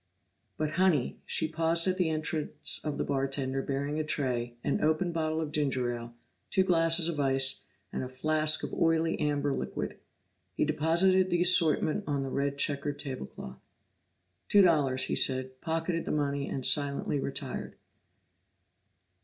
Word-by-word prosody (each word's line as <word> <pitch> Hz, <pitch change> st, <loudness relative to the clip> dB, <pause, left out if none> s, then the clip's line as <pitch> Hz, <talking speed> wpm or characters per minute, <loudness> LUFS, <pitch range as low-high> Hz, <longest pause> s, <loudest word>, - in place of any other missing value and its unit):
"But 155 Hz, -1 st, -1 dB
Honey 165 Hz, -9 st, +2 dB
" -, -, -39 dB
she 160 Hz, -, +1 dB
paused 165 Hz, +2 st, +2 dB
at 185 Hz, 0 st, +1 dB
the 175 Hz, -3 st, +2 dB
entrance 155 Hz, -1 st, -1 dB
of 150 Hz, -2 st, -3 dB
the -, -, -1 dB
bartender 135 Hz, -1 st, -1 dB
bearing 140 Hz, +3 st, -3 dB
a -, -, 0 dB
tray, 125 Hz, -6 st, -2 dB
an -, -, -1 dB
opened 160 Hz, +3 st, +1 dB
bottle 160 Hz, -1 st, -1 dB
of 155 Hz, -2 st, -3 dB
ginger 130 Hz, -5 st, 0 dB
ale, 120 Hz, 0 st, -8 dB, 0.3 s
two 190 Hz, -, +3 dB
glasses 165 Hz, -2 st, +3 dB
of 165 Hz, -3 st, -3 dB
ice, 135 Hz, -1 st, +2 dB, 0.3 s
and -, -, -3 dB
a 130 Hz, -, -6 dB
flask 155 Hz, +4 st, +1 dB
of -, -, -5 dB
oily 165 Hz, 0 st, +1 dB
amber 145 Hz, -1 st, 0 dB
liquid. -, -, -4 dB, 0.6 s
He -, -, +1 dB
deposited 170 Hz, +5 st, +3 dB
the 175 Hz, -1 st, +2 dB
assortment 170 Hz, +1 st, +3 dB
on 140 Hz, -2 st, -1 dB
the 135 Hz, -, -4 dB
red 140 Hz, +1 st, -2 dB
checked 145 Hz, 0 st, -1 dB
table 130 Hz, -, -5 dB
cloth. 65 Hz, 0 st, -10 dB, 0.9 s
"Two 205 Hz, -1 st, +6 dB
dollars," 145 Hz, -7 st, +3 dB
he -, -, -1 dB
said, 130 Hz, 0 st, +2 dB
pocketed 165 Hz, +1 st, -2 dB
the -, -, -3 dB
money 140 Hz, -2 st, -1 dB
and 130 Hz, -2 st, -2 dB
silently 140 Hz, -1 st, +2 dB
retired. 135 Hz, 0 st, -4 dB
150 Hz, 160 wpm, -29 LUFS, 135-165 Hz, 0.9 s, Two